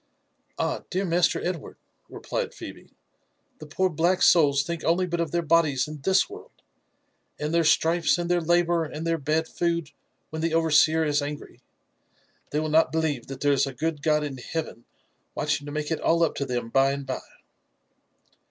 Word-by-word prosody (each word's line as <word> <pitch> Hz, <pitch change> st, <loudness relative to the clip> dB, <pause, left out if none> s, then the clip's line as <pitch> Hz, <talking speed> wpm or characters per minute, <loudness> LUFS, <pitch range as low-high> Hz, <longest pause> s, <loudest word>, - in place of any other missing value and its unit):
/ -, -, -46 dB, 0.5 s
''Ah -, -, -1 dB
I -, -, -23 dB
dear 190 Hz, +1 st, -1 dB
masterEdwardf" 175 Hz, -1 st, 0 dB, 0.3 s
replied -, -, -4 dB
Phebe, -, -, -10 dB, 0.7 s
''the 155 Hz, -, -10 dB
poor 185 Hz, +5 st, +1 dB
blaek 175 Hz, +2 st, +1 dB
souls 140 Hz, -5 st, +5 dB
think 170 Hz, +2 st, -5 dB
only 175 Hz, +3 st, +2 dB
but 175 Hz, -1 st, -3 dB
of 170 Hz, -2 st, 0 dB
their 170 Hz, +2 st, -1 dB
bodies 155 Hz, -5 st, +2 dB
in 150 Hz, -1 st, -8 dB
this 190 Hz, +5 st, +3 dB
world, 425 Hz, +4 st, -13 dB, 0.8 s
and 150 Hz, +2 st, -2 dB
their 170 Hz, 0 st, +3 dB
stripes 165 Hz, +2 st, +3 dB
and 175 Hz, 0 st, -2 dB
Ibeh: 175 Hz, -2 st, 0 dB
labour 175 Hz, -1 st, +3 dB
and 155 Hz, +1 st, -6 dB
their 165 Hz, 0 st, 0 dB
bad 155 Hz, +3 st, 0 dB
food 170 Hz, -3 st, -2 dB, 0.4 s
when 160 Hz, 0 st, -4 dB
the 165 Hz, 0 st, 0 dB
overseer 160 Hz, 0 st, +4 dB
is 145 Hz, -1 st, +1 dB
angry. 145 Hz, +1 st, -7 dB, 0.9 s
They 150 Hz, -, -1 dB
will 155 Hz, 0 st, -2 dB
not 160 Hz, +2 st, +3 dB
believe 155 Hz, -7 st, -1 dB
that 135 Hz, -1 st, -8 dB
there 145 Hz, 0 st, +3 dB
is 140 Hz, 0 st, +2 dB
a 135 Hz, -, -5 dB
good 155 Hz, +1 st, -2 dB
God 150 Hz, 0 st, +2 dB
in 140 Hz, -3 st, -5 dB
heaven 125 Hz, -3 st, -5 dB, 0.5 s
watching 145 Hz, -1 st, -1 dB
to -, -, -6 dB
make 150 Hz, +1 st, -3 dB
it 160 Hz, -, -1 dB
all 170 Hz, +1 st, +3 dB
up 165 Hz, -, +1 dB
to 140 Hz, -, -2 dB
them 120 Hz, -2 st, -3 dB
by 135 Hz, +2 st, +3 dB
|ad 140 Hz, 0 st, -5 dB
by." 130 Hz, -1 st, -4 dB
160 Hz, 190 wpm, -25 LUFS, 145-170 Hz, 0.9 s, souls